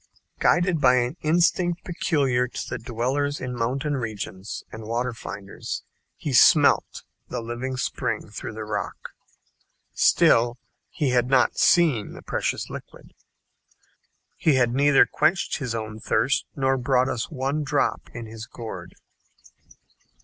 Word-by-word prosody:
Guided 175 -1 +2
by 130 -2 +6
an 125 +3 0
instinct 175 +2 +2
peculiar 140 -8 0
to - - -6
the - - -4
dwellers 130 +5 -1
in 125 -1 -4
mountain 130 +5 -1
regions 110 -5 -5
and 110 0 -8
water 120 +2 -1
finders, 100 -3 -7 0.3
he - - -4
"smelt" - - +5 0.2
the 125 - -4
living 120 +3 -4
spring - - -2
through 110 +1 -7
the 110 0 -6
rock. 105 -1 -5 0.8
Still 120 +1 +4 0.3
he 145 -5 -1
had 125 -1 +2
not 130 -2 +3
seen 160 - +3
the - - -11
precious - - -2
liquid. - - -11 1.2
He 155 -4 +3
had 120 -2 +2
neither 140 +1 +5
quenched 160 +4 +1
his 125 -6 -3
own 110 -1 -5
thirst, 115 +5 +1
nor 135 -1 +1
brought 125 0 +2
us 120 -3 -3
one 140 0 -2
drop 145 0 -1
in 120 -1 -7
his 110 0 -9
gourd. 115 -2 -8
125 Hz, 135 wpm, -24 LUFS, 115-145 Hz, 1.2 s, by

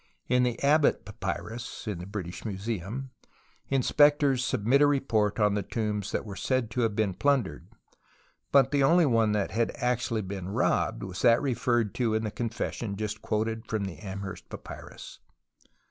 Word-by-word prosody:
In 125 0 +3
the 125 -2 0
Abbott 150 +1 +3
papyrus 120 +2 -5
(in 100 -5 -3
the 90 - -7
British 95 -4 -6
Museum) 110 +4 -4 0.6
inspectors 140 0 +4
submit 125 +5 +2
a 145 - +7
report 115 -7 +1
on 105 -1 +3
tlie 100 -1 -3
tombs 105 -3 -2
that - - -2
were 100 -3 -7
said 120 +3 -1
to 125 - -1
have 110 -3 +1
been 105 -3 +1
plundered, 120 - 0 0.8
but 135 -1 +5
the 145 -1 +2
only 170 +5 +5
one 115 -5 +3
that 105 -2 0
had 115 +1 +1
actually 125 -4 -1
been 95 -1 -5
robbed 100 - 0
was 95 -1 -5
that 115 +1 +6
referred 120 -5 0
to 115 -3 0
in 110 - 0
the 105 - -2
confession 115 -2 -3
just 110 +1 -4
quoted 110 +1 -2
from 110 -3 -1
the 95 -3 -7
Amherst 95 -1 -7
papyrus. - - -10
115 Hz, 165 wpm, -28 LUFS, 105-125 Hz, 0.8 s, a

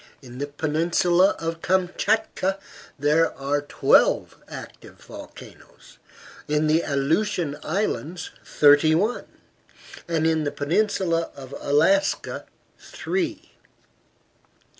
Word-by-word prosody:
In 125 0 -11
the 145 - -3
peninsula 170 +5 +2
of 165 0 -4
Kamchatka 190 +2 0 0.4
there 150 +3 +2
are 140 +1 -1
twelve 145 - +2
active - - -11
volcanoes, - - -14 0.5
in 150 +1 +1
the 155 +2 +3
Aleutian 150 +2 0
Islands 175 -1 -3
thirty 145 +2 +4
one, 215 +8 -1 0.8
and 165 -2 0
in 160 -1 +2
the 145 - -2
peninsula 170 +1 0
of 135 -1 -11
Alaska 165 +8 +1 0.3
three. 330 -4 -4
165 Hz, 95 wpm, -24 LUFS, 145-185 Hz, 0.8 s, thirty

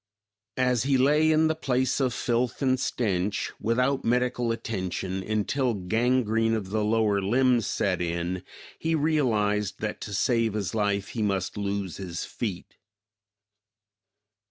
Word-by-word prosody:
As 125 -2 +2
he 135 +1 +2
lay 150 +4 +4
in 155 0 +4
the 160 - +2
place 130 -4 0
of 130 -2 +1
filth 120 +3 -1
and 130 -1 +2
stench, 105 -6 -1
without 125 +4 +1
medical 125 0 +1
attention 95 -4 -3
until 110 +5 0
gangrene 115 +3 +1
of 100 -4 -4
the 110 0 0
lower 105 -2 +2
limbs 120 +2 +2
set 90 -3 0
in, 85 +1 -2 0.4
he 165 0 0
realized 110 - +1
that - - -4
to - - -6
save 115 +1 +1
his 100 -4 -2
life 100 -2 0
he 115 - -4
must 100 -3 -1
lose 100 -3 -3
his 90 -3 -5
feet. 100 -7 -5
115 Hz, 135 wpm, -27 LUFS, 100-125 Hz, 0.4 s, lay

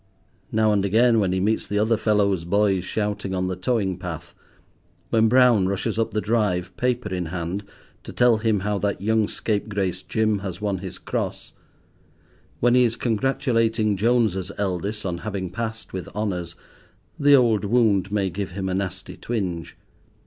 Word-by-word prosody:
Now 110 -1 +3
and 100 -1 +1
again, 115 +4 +4
when 95 -3 +1
he 95 - 0
meets 110 +4 0
the 105 - -2
other 110 +2 +3
fellows' 105 -5 +1
boys 95 +1 +2
shouting 105 -1 -2
on 90 0 0
the 95 - -2
towing 95 -2 -1
path; 90 -4 -7 0.8
when 110 0 +4
Brown 120 -6 +5
rushes 105 +3 -2
up 115 - +1
the 105 - -1
drive, 95 -5 0
paper 125 -3 -1
in 90 -2 -2
hand, 90 +3 -4 0.4
to - - -7
tell 120 -2 +4
him 110 -2 +1
how 105 0 -1
that 100 0 -1
young 110 +1 +1
scapegrace 100 -4 -2
Jim 110 +2 0
has 95 -2 -6
won 100 -3 -1
his 95 -1 -7
Cross; - - -4 1.1
when 120 0 +3
he 125 0 +6
is 115 -1 +1
congratulating 115 -3 +1
Jones's 105 -4 +1
eldest 100 +2 -2
on 85 -2 -2
having 95 -2 -4
passed 115 +3 -5
with 95 -1 -5
honours, 90 -5 -3 0.6
the 145 0 +6
old 115 -6 +3
wound 100 -3 +2
may 100 -3 0
give 95 0 -4
him 95 0 -3
a - - -1
nasty 95 -1 -4
twinge. 90 -8 -4
105 Hz, 165 wpm, -23 LUFS, 95-110 Hz, 1.1 s, he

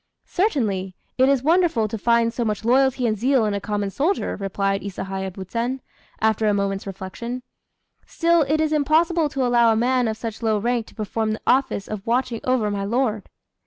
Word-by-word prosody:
"Certainly, 210 - -1 0.2
it 260 +1 +5
is 275 -2 +2
wonderful 320 -8 +3
to 215 - -5
find 230 +1 +2
so 240 - -1
much 215 -1 -2
loyalty 260 +1 +3
and 220 -2 +1
zeal 250 +2 +2
in 210 - 0
a 200 - -2
common 205 -1 -2
soldier," 330 - 0
replied 195 0 -1
Isahaya 190 -1 -4
Buzen, 230 +8 -3 0.4
after 220 0 +2
a 205 - +3
moment's 200 0 -2
reflection; 195 +6 -6 0.6
"still 335 0 +2
it 305 +2 +1
is 310 0 +1
impossible 310 +2 +2
to 270 -2 -1
allow 240 -1 +4
a - - +2
man 250 +1 +2
of 220 0 -2
such 225 -1 -6
low 220 -2 +1
rank 235 +1 -1
to - - -17
perform 215 0 -2
the 215 - -6
office 260 -6 +1
of 215 -1 -6
watching 240 -1 0
over 250 -5 +1
my 200 -1 -2
lord." 220 -1 -1
230 Hz, 190 wpm, -22 LUFS, 205-265 Hz, 0.6 s, it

